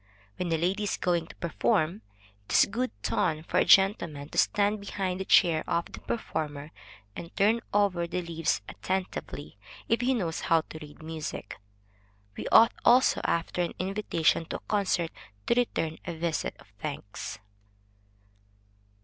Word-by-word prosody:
When 180 -2 -2
a 165 - +2
lady 180 +5 0
is 205 - -1
going 170 -2 0
to - - -13
perform, 170 +3 0 0.4
it - - -6
is - - +7
good 250 +5 -2
ton 155 -1 0
for - - 0
a - - +3
gentleman 170 -7 +4
to - - -8
stand 205 +1 +2
behind 190 -2 -3
the 190 - -3
chair 165 -5 +5
of 170 - -1
the - - -8
performer, 150 -9 -4 0.4
and 170 - -7
turn 220 +4 +3
over 195 -4 +2
the 180 +1 -3
leaves 165 -6 -1
attentively, 180 - -4 0.3
if 230 +2 +2
he 255 +1 +2
knows 170 -8 -2
how 165 -1 +3
to 160 - -8
read 150 +1 -12
music. 155 -9 -6 0.8
We - - -5
ought 230 +1 +7
also 255 +2 +5
after 170 +1 0
an 175 - -2
invitation 185 -4 +1
to - - -5
a - - -4
concert, 185 -5 +1 0.3
to - - +3
return 165 -10 0
a 170 - -5
visit 160 - -2
of - - -17
thanks. 100 0 -6
170 Hz, 160 wpm, -28 LUFS, 160-200 Hz, 0.8 s, is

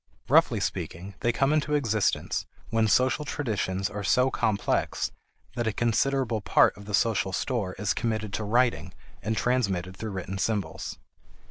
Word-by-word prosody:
Roughly - - +5
speaking, 95 +4 -4
they 120 - +2
come 135 +5 +2
into 150 -1 +1
existence 110 -8 0 0.2
when 115 -1 +3
social 130 +7 +3
traditions 105 -9 -1
are 105 0 -5
so 125 +6 +3
complex 105 -4 0 0.4
that 120 -2 -1
a - - +2
considerable 120 +1 +1
part - - +4
of 100 - -12
the 105 -1 +1
social 105 -3 +1
store 100 -2 -1
is 105 +1 -1
committed 110 -3 -2
to 110 - -2
writing 115 -4 +1 0.3
and 110 +1 -2
transmitted 100 -8 0
through 110 0 -5
written 95 +1 -4
symbols. 105 -1 -2
110 Hz, 150 wpm, -27 LUFS, 100-125 Hz, 0.4 s, Roughly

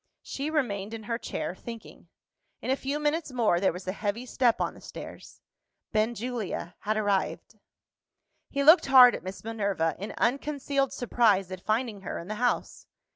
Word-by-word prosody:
She 280 +2 -4
remained 225 -9 -1
in 220 - -8
her 230 +2 -3
chair, - - -4
thinking. 230 +4 -10 0.5
In - - -2
a - - +3
few 280 +2 -3
minutes 300 0 -1
more, 225 -8 +2
there 190 - +3
was 180 +2 -9
a - - +1
heavy 210 +4 -3
step 245 -2 +2
on - - -1
the - - -15
stairs. - - -10 0.5
Benjulia 220 -4 -2
had 215 +1 -1
arrived. 205 -3 -1 0.9
He 280 0 -1
looked 315 +3 +7
hard 255 -2 +9
at - - -4
Miss 185 +1 -8
Minerva, 200 -8 -1
in 200 +3 -6
unconcealed 275 +1 0
surprise 215 -6 +2
at 185 -1 -6
finding 215 -1 -1
her 190 - -5
in 170 - -8
the - - -2
house. 245 - -1
225 Hz, 170 wpm, -28 LUFS, 200-260 Hz, 0.9 s, hard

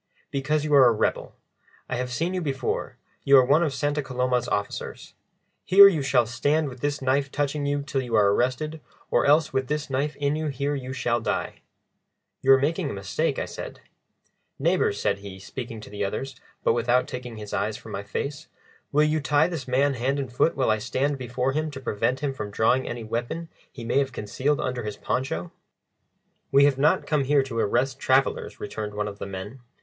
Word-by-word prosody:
"Because 145 +2 0
you 150 - -1
are 135 -3 +8
a - - +5
rebel. 110 - -1 0.5
I 125 - -2
have 125 0 -2
seen 165 +8 -1
you 185 - -1
before, 135 -5 -3 0.3
you 140 0 +7
are 130 - +6
one 145 +5 +4
of 160 -4 +1
Santa 145 +2 -1
Coloma's 125 -2 -1
officers. 100 -4 -4 0.5
Here 200 +2 +9
you 170 -7 +2
shall 135 -3 +3
stand 145 +6 0
with 125 -1 -11
this 145 +1 -2
knife 135 +1 +1
touching 145 0 -1
you 145 0 0
till 140 -2 -2
you 120 -3 -2
are 100 -2 +5
arrested, 150 +7 -1 0.3
or - - +3
else 150 +2 +4
with 130 -1 0
this 150 -1 -3
knife 140 +3 -1
in 145 +1 0
you 155 0 -2
here 140 +1 -2
you 130 -2 -4
shall 120 -2 0
die." - - -3 0.8
"You 135 - +4
are - - +7
making 155 +3 0
a - - -4
mistake," 100 -1 -1
I - - -1
said. - - -8 0.8
"Neighbours," - - +1
said 100 - 0
he, 100 -1 -9
speaking 115 +2 -7
to - - -11
the 105 0 -3
others, 135 +7 -3 0.3
but - - +3
without 120 +2 +2
taking 125 -2 -7
his 105 -1 -8
eyes 110 0 -1
from - - -11
my 100 - -3
face, 145 +9 -5 0.4
"will 150 +1 +4
you 155 +1 +2
tie 145 +2 +3
this 165 -7 -5
man 135 +3 +2
hand 130 +3 -1
and 135 -4 -4
foot 160 - +2
while 130 -5 +2
I 110 - +1
stand 135 +5 -1
before 125 +1 -1
him 155 +3 -1
to 140 -2 -8
prevent 125 +1 -1
him 140 -2 -1
from 105 -5 -5
drawing 115 +5 +2
any 120 -1 -5
weapon 120 +9 -4 0.2
he 120 - -9
may 120 - +2
have 135 -1 0
concealed 130 +7 -1
under 125 -1 -2
his 105 -2 -5
poncho?" 95 -10 -2 1.0
"We 140 +1 +6
have 140 -2 +2
not 145 - +3
come 150 -3 +1
here 140 0 +3
to 125 -4 -4
arrest 130 +5 +1
travellers," 130 0 +1
returned 105 -1 -5
one 105 0 -1
of 100 0 -8
the - - -5
men. 100 +6 -7
130 Hz, 205 wpm, -25 LUFS, 120-145 Hz, 1.0 s, Here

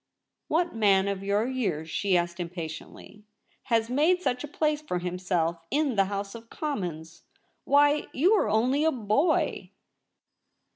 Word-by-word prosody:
' - - -59
What 340 +3 0
man 200 -3 +3
of 200 -1 -3
your 200 +2 +1
years,' 190 -12 -2
she 195 -3 +2
asked 175 0 -2
Im 175 -1 -3
patiently, 170 +4 -9 0.2
' - - -43
has 225 -1 +1
made 305 +9 +2
such 250 -8 -1
a - - -5
place 300 0 0
for 240 -12 -3
himself 175 -2 -1
in 290 -3 +1
the 195 -1 +3
House 200 0 -4
of 230 0 -11
Commons 170 - -5 0.2
} - - -45
Why, 290 +1 +4
you 350 +11 +3
are 425 - +2
only 250 +7 +2
a 320 - +3
boy 245 - 0
215 Hz, 165 wpm, -27 LUFS, 180-290 Hz, 0.2 s, Why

